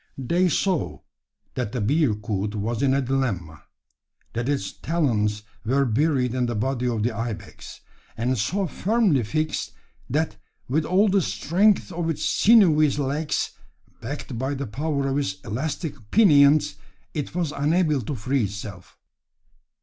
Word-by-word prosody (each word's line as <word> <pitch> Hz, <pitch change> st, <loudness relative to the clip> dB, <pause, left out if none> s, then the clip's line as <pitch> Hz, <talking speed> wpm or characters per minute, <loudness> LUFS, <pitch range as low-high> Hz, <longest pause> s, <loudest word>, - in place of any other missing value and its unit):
They 170 Hz, +8 st, +1 dB
saw 185 Hz, +1 st, 0 dB, 0.5 s
that 105 Hz, -, -3 dB
the 125 Hz, -, -1 dB
bearcoot 105 Hz, -5 st, 0 dB
was 110 Hz, +3 st, -2 dB
in 135 Hz, -1 st, +3 dB
a 140 Hz, -, +1 dB
dilemma; 110 Hz, -, -2 dB, 0.7 s
that 120 Hz, +3 st, -2 dB
its 135 Hz, -10 st, -1 dB
talons 105 Hz, -11 st, 0 dB, 0.2 s
were 135 Hz, +4 st, +2 dB
buried 130 Hz, 0 st, +1 dB
in 125 Hz, -1 st, 0 dB
the 120 Hz, -, -2 dB
body 125 Hz, +3 st, -1 dB
of 115 Hz, -3 st, -1 dB
the 120 Hz, -, +1 dB
ibex, 115 Hz, -2 st, -6 dB, 0.4 s
and 125 Hz, +3 st, 0 dB
so 190 Hz, -, 0 dB
firmly 195 Hz, -, +1 dB
fixed, 155 Hz, +8 st, -2 dB, 0.4 s
that 155 Hz, +5 st, -1 dB, 0.3 s
with 155 Hz, +5 st, 0 dB
all 190 Hz, +6 st, +3 dB
the 195 Hz, 0 st, +3 dB
strength 195 Hz, +5 st, +2 dB
of 170 Hz, -1 st, -2 dB
its 160 Hz, -, -2 dB
sinewy 175 Hz, -9 st, +5 dB
legs, 145 Hz, +2 st, -1 dB, 0.5 s
backed 115 Hz, -, -5 dB
by 135 Hz, +2 st, -1 dB
the 140 Hz, +1 st, -4 dB
power 140 Hz, +4 st, -2 dB
of 135 Hz, +1 st, 0 dB
its 95 Hz, -9 st, -2 dB
elastic 145 Hz, -, -3 dB, 0.2 s
pinions, 145 Hz, -, +5 dB, 0.4 s
it 150 Hz, +1 st, -4 dB
was 170 Hz, -4 st, 0 dB
unable 150 Hz, 0 st, +1 dB
to 135 Hz, +6 st, -4 dB
free 130 Hz, +1 st, 0 dB
itself! 100 Hz, -2 st, -8 dB
140 Hz, 140 wpm, -24 LUFS, 115-160 Hz, 0.7 s, sinewy